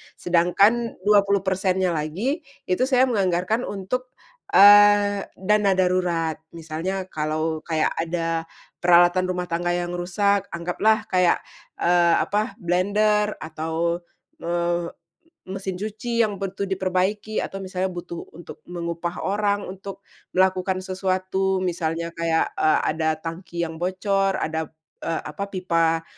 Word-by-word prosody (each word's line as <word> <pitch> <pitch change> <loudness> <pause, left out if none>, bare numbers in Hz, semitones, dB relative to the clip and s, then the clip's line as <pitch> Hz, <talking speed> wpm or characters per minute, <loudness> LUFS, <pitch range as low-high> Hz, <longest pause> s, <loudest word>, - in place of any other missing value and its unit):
sedangkan 195 +7 +2
20%-nya 190 -2 +2
lagi, 175 - -2 0.2
itu 185 +7 +1
saya 255 -1 +4
menganggarkan 200 -1 0
untuk, 250 +6 -4 0.4
eee, 205 0 +6
dana 205 +1 +2
darurat. 175 -4 0
Misalnya 165 +4 -4
kalau 155 +1 -2
kayak 160 -1 +1
ada 165 -1 -2 0.3
peralatan 175 +1 +5
rumah 180 -1 -3
tangga 175 +1 0
yang 175 0 -2
rusak, 200 +3 +1
anggaplah 180 +6 +1
kayak, 180 -1 +3 0.4
eee, 175 -1 +4
apa, 210 +3 -1
blender 210 +4 +2
atau, 160 +2 -2 0.4
eee, 170 0 -1 0.6
m 190 - -4
mesin 190 -1 -4
cuci 230 +3 -2
yang 205 -3 0
butuh 195 0 -4
diperbaiki, 190 +3 -1
atau 195 - -5
misalnya 185 0 -2
butuh 175 -1 -7 0.2
untuk 175 - -11
mengupah 170 0 -4
orang 205 0 0
untuk 195 +1 -9 0.3
melakukan 185 0 +2
sesuatu, 190 0 -1
misalnya 170 -1 -2
kayak, 165 -1 0
eee, 155 - +4
ada 160 0 0
tangki 170 +1 -5
yang 160 -1 -5
bocor, 195 +1 0
ada, 160 0 -2 0.3
eee, 165 - -2
apa, 200 - -5
pipa 165 -3 +1
185 Hz, 120 wpm, -23 LUFS, 170-200 Hz, 0.6 s, eee